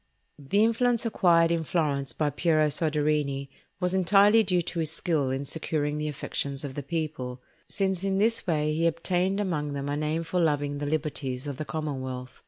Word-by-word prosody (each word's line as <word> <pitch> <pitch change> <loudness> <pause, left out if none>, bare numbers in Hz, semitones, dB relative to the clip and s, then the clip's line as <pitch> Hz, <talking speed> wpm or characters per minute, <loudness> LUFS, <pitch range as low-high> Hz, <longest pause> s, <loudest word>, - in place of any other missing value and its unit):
The 195 +10 +2
influence 235 +1 +2
acquired 170 -6 +4
in 165 -1 +1
Florence 145 -4 -1
by 150 -2 -1
Piero 155 +1 +2
Soderini 150 -3 0 0.3
was 180 0 0
entirely 200 +4 +5
due 180 -4 +1
to 170 0 -4
his 160 -2 0
skill 160 -4 0
in 135 +2 -2
securing 150 0 -2
the 150 - -2
affections 140 -1 -4
of 135 - -6
the 145 - -4
people, 140 -4 -4 0.3
since 190 -2 -1
in 195 -1 0
this 225 +1 +1
way 155 -2 +1
he 165 +2 +2
obtained 180 +4 0
among 155 -7 -1
them 140 0 -3
a 145 - -1
name 155 +2 -1
for 165 +2 -1
loving 145 -3 +1
the 145 - -3
liberties 145 -4 -2
of 140 -3 -5
the 155 - -4
commonwealth. 130 -5 -5
155 Hz, 185 wpm, -27 LUFS, 145-180 Hz, 0.3 s, entirely